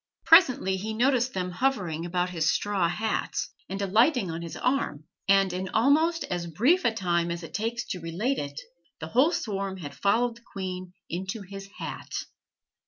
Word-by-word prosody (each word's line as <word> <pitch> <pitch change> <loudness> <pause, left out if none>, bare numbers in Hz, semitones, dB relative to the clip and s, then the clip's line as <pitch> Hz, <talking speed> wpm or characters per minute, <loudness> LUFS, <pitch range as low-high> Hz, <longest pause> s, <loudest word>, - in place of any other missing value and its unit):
Presently 260 - +6
he 215 +3 -4
noticed 255 +1 +2
them 180 -1 -2
hovering 180 -8 -1
about 180 +1 0
his 160 -2 +2
straw 195 -5 +1
hat, 215 +4 -2 0.3
and 195 +1 -4
alighting 215 - +3
on 165 +1 -4
his 170 -1 -6
arm; 250 - 0 0.2
and 195 -1 +4
in 185 +1 -3
almost 310 +8 +3
as 175 -1 -3
brief 245 - +3
a 235 - +4
time 175 -5 0
as 170 0 -4
it 165 - -9
takes 230 +3 -2
to 180 - -3
relate 190 +12 -1
it, 145 +1 -5 0.4
the 160 - -6
whole 265 - +4
swarm 195 - -2
had 145 -6 -7
followed 225 - +1
the - - -19
queen 185 -1 -5
into 190 +5 -4
his 195 +1 -9
hat. - - -6
195 Hz, 170 wpm, -27 LUFS, 175-235 Hz, 0.4 s, Presently